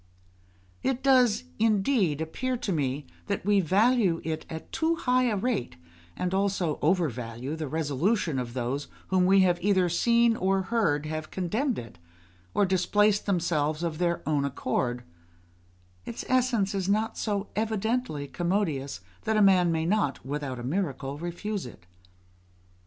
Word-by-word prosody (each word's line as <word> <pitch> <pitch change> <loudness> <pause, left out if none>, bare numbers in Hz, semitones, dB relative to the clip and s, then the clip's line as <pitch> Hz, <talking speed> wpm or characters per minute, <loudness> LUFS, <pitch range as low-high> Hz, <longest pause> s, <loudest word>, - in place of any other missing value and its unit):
It 265 -1 -1
does, 255 - +4 0.2
indeed, 205 - +2
appear 250 +11 -2
to 210 - -3
me 140 -3 -1 0.2
that 200 -3 -2
we 205 -1 +4
value 200 0 +3
it 160 -1 -4
at 160 0 -8
too 330 +1 +1
high 255 -4 +2
a 220 -4 +1
rate, 205 - -1 0.4
and 180 0 -2
also 190 -5 0
overvalue 135 - -1
the 160 -2 -4
resolution 160 - 0
of 120 -1 -5
those 130 +3 -2 0.2
whom 185 -1 +3
we 195 0 +6
have 175 -2 +2
either 185 -2 +3
seen 235 +6 +3
or 190 -1 +1
heard 185 -9 +1
have 155 0 -4
contemned 215 - -1
it, 115 -7 -9 0.6
or 205 - +4
displaced 205 +3 +2
themselves 160 -4 0
of 165 -2 -2
their 170 -1 -1
own 150 -2 +1
accord: 125 -3 -2 1.0
its 225 - -6
essence 245 -6 +2
is 195 -1 -1
not 215 +2 +1
so 205 -2 -2
evidently 220 - -1
commodious 165 - -1 0.2
that 220 0 +1
a - - +4
man 185 -3 +5
may 160 0 0
not, 170 - 0
with 145 +2 -3
out 130 -3 -4
a 120 - -7
miracle, 140 -2 -2
refuse 175 +1 -4
it. 95 -6 -14
180 Hz, 150 wpm, -27 LUFS, 150-210 Hz, 1.0 s, we